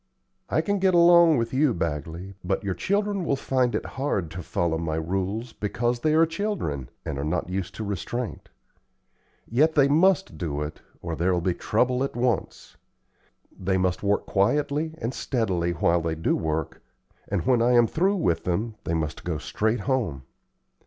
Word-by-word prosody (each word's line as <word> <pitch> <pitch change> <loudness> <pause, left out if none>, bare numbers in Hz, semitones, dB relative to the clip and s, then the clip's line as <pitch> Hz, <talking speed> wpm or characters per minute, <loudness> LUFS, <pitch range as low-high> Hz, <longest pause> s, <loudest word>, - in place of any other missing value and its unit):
"I - - +2
can 205 -1 0
get 185 -1 +3
along 170 -2 +7
with 115 0 -1
you, 135 -1 +3
Bagley, 85 +3 -4
but 95 +3 -1
your 100 -2 -1
children 200 - 0
will 140 - +1
find 130 -2 0
it - - -2
hard 100 - -2
to 90 +2 -6
follow 80 0 -1
my 80 -2 -2
rules, 95 +8 -2
because 120 +3 -1
they 155 +5 +2
are 165 +1 +6
children, 165 - -3 0.2
and 70 -2 -3
are - - -2
not 80 +4 -1
used 95 -1 -3
to 110 - -4
restraint. 105 +4 -4 1.0
Yet 155 +7 +2
they 140 -2 +5
must 185 +6 +3
do 75 -4 -2
it, 75 +1 -7 0.2
or 85 -2 -3
there'll 90 +2 +1
be 90 +1 0
trouble 125 +7 +1
at 135 - -3
once. 120 -3 -2 0.8
They 95 0 0
must 90 -1 0
work 100 0 +1
quietly 145 +9 +1
and 120 -2 -3
steadily 95 -9 -1
while 85 0 +2
they 80 0 -2
do 80 - 0
work, 80 -1 -3 0.5
and - - -2
when 125 -2 +3
I 120 +1 +4
am 120 -1 +6
through 190 - +1
with 85 - 0
them, 105 +6 -1
they 85 - 0
must 80 -1 -3
go 85 -3 -2
straight 110 +8 -1
home. 115 - -1
110 Hz, 175 wpm, -25 LUFS, 85-140 Hz, 1.0 s, along